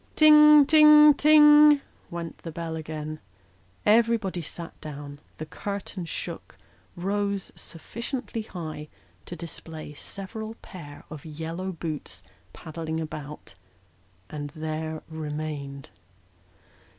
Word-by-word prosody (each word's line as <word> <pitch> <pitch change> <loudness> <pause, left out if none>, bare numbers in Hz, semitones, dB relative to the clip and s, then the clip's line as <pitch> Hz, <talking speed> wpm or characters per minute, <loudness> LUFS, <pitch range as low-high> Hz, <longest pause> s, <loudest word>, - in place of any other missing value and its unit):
Ting, 300 -1 +8
ting, 300 0 +8
ting! 295 0 +7 0.3
went 170 -2 -6
the 165 - -8
bell 165 0 -5
again. 155 -1 -6 0.7
Everybody 220 -4 +2
sat 165 +2 -9
down; 145 -1 -8 0.2
the 155 - -6
curtain 200 +1 -6
shook; 165 - -7 0.4
rose 200 +2 -2
sufficiently 235 - -6
high 155 -7 -7 0.4
to - - -6
display 160 -2 -9
several 215 +7 -7
pair 145 -6 -11
of 155 -3 -8
yellow 165 +4 -5
boots 155 - -6 0.3
paddling 160 0 -5
about; 150 -2 -7 0.7
and 145 +3 -6
there 155 0 -4
remained. 150 -3 -6
165 Hz, 100 wpm, -26 LUFS, 155-220 Hz, 0.7 s, Ting